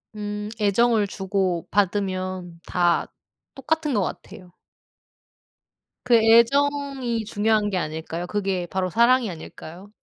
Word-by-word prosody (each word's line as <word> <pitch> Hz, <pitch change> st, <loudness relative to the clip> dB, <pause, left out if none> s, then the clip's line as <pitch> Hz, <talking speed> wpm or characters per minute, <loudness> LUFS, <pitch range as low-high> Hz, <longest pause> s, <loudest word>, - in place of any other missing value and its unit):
음 210 Hz, 0 st, -5 dB
애정을 215 Hz, +1 st, +2 dB
주고받으면 185 Hz, -1 st, -2 dB
다 175 Hz, -1 st, +1 dB, 0.4 s
똑같은 305 Hz, +1 st, -1 dB
것 210 Hz, -, +2 dB
같아요. 180 Hz, 0 st, -8 dB, 1.5 s
그 245 Hz, -1 st, +4 dB
애정이 245 Hz, +1 st, +3 dB
중요한 210 Hz, 0 st, +1 dB
게 190 Hz, -, -2 dB
아닐까요? 160 Hz, +1 st, -4 dB
그게 195 Hz, -2 st, -2 dB
바로 185 Hz, -1 st, -1 dB
사랑이 235 Hz, +4 st, +3 dB
아닐까요? 175 Hz, +3 st, -10 dB
205 Hz, 240 characters per minute, -23 LUFS, 185-235 Hz, 1.5 s, 그